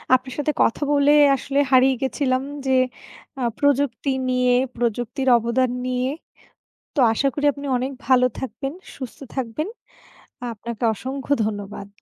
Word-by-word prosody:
আপনার 255 0 -3
সাথে 295 +1 0
কথা 230 - +2
বলে 285 0 +4 0.2
আসলে 275 +1 -1
হারিয়ে 260 0 +5
গেছিলাম 265 -1 0 0.2
যে, 265 - +1 0.7
আ - - -3 0.2
প্রযুক্তি 285 -2 +1 0.2
নিয়ে, 250 -1 +3 0.2
প্রযুক্তির 240 +2 -2
অবদান 235 +3 +1 0.2
নিয়ে। 255 0 0 0.9
তো 295 - +1
আশা 275 - 0
করি 290 - -3
আপনি 285 +1 -8
অনেক 260 +2 -2
ভালো 255 0 +5
থাকবেন, 270 +1 -4 0.2
সুস্থ 260 -4 -8 0.2
থাকবেন। 265 - -3 0.9
আপনাকে 230 +2 -7
অসংখ্য 265 +5 -3
ধন্যবাদ। 205 -1 -5
255 Hz, 130 wpm, -22 LUFS, 240-275 Hz, 0.9 s, হারিয়ে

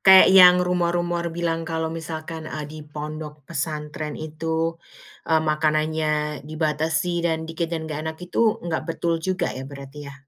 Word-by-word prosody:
kayak 190 -1 +9
yang 180 -1 +9
rumor-rumor 175 -1 0
bilang 165 0 -1
kalau 160 -1 -2
misalkan, 160 0 -6
eee, 155 -1 -4
di 155 - -8
pondok 150 0 -7
pesantren 150 +1 -4
itu, 160 +1 -2 0.5
eee, 160 - +5
makanannya 155 -1 +1
dibatasi 160 +2 0
dan 160 -1 0
dikit 165 +1 -3
dan 165 -1 -3
nggak 155 -1 -4
enak 160 - -5
itu, 215 +5 +2
nggak 165 -2 -1
betul 165 0 0
juga, 185 +1 -1
ya, 130 +1 -7
berarti 140 0 -10
ya? 140 - -10
160 Hz, 150 wpm, -24 LUFS, 155-170 Hz, 0.5 s, kayak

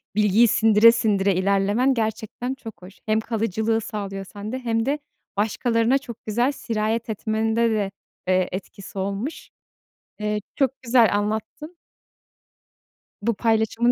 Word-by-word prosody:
Bilgiyi 210 +2 +5
sindire 220 +1 +6
sindire 200 -5 +1
ilerlemen 200 +7 +2
gerçekten 225 +2 -3
çok 225 -8 -11
hoş. 185 +2 -13
Hem 215 0 +2
kalıcılığı 225 0 -1
sağlıyor 195 -2 -5
sende, 210 +6 -6
hem 225 -2 0
de 290 +2 0 0.4
başkalarına 230 +4 +2
çok 235 -4 -10
güzel 240 +5 +1
sirayet 225 -3 -2
etmende 220 +2 0
de, 205 -3 0 0.4
eee, 185 0 +2
etkisi 195 +1 -7
olmuş. 200 +10 -4 0.7
Eee, 210 0 -1
çok 270 -1 0
güzel 235 -4 +4
anlattın. 220 +11 -4 1.5
Bu 230 +2 +1
paylaşımın 225 +2 +2
220 Hz, 120 wpm, -23 LUFS, 205-235 Hz, 1.5 s, sindire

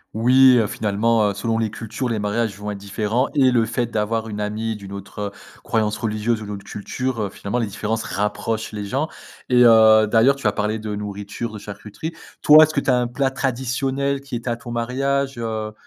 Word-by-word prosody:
Oui, 125 +3 +6
heu, 115 - +3
finalement, 105 +1 +1
heu, - - -2
selon 115 +3 -1
les 110 -1 0
cultures, 115 +4 -4
les 115 - -1
mariages 105 0 -1
vont 105 +1 -5
être 100 - -6
différents 105 +5 -1
et 130 -3 +5
le 120 -2 +3
fait 125 - -1
d'avoir 110 +1 -1
une 105 -1 -5
amie 110 +2 -2
d'une 100 -2 -10
autre, 100 +1 -9
heu, 100 -1 -3 0.3
croyance 105 -1 0
religieuse 110 +1 -1
ou - - -6
d'une 105 0 -5
autre 100 - -10
culture, 125 +3 -4
heu, 100 - -2
finalement, 100 +5 -4
les 115 - -1
différences 110 +2 -3
rapprochent 105 +3 -2
les 105 -1 -5
gens. 135 +9 -1 0.4
Et 125 -1 +5
heu, 110 -1 +7
d'ailleurs, 115 +5 +4
tu 140 -5 -2
as - - +3
parlé 105 +2 -2
de 105 -1 -4
nourriture, 105 +2 -5
de 105 - -7
charcuterie. 105 +9 -7 0.3
Toi, 155 +1 +9
est-ce 155 0 +1
que - - +1
tu 140 - -3
as 125 - +4
un 125 - +1
plat 135 +3 0
traditionnel 135 +1 -1
qui 140 -3 -7
était 120 +1 -4
à 120 - 0
ton 120 -1 -9
mariage, 135 +3 -1
heu, 110 -2 -4
110 Hz, 220 wpm, -21 LUFS, 105-125 Hz, 0.4 s, Toi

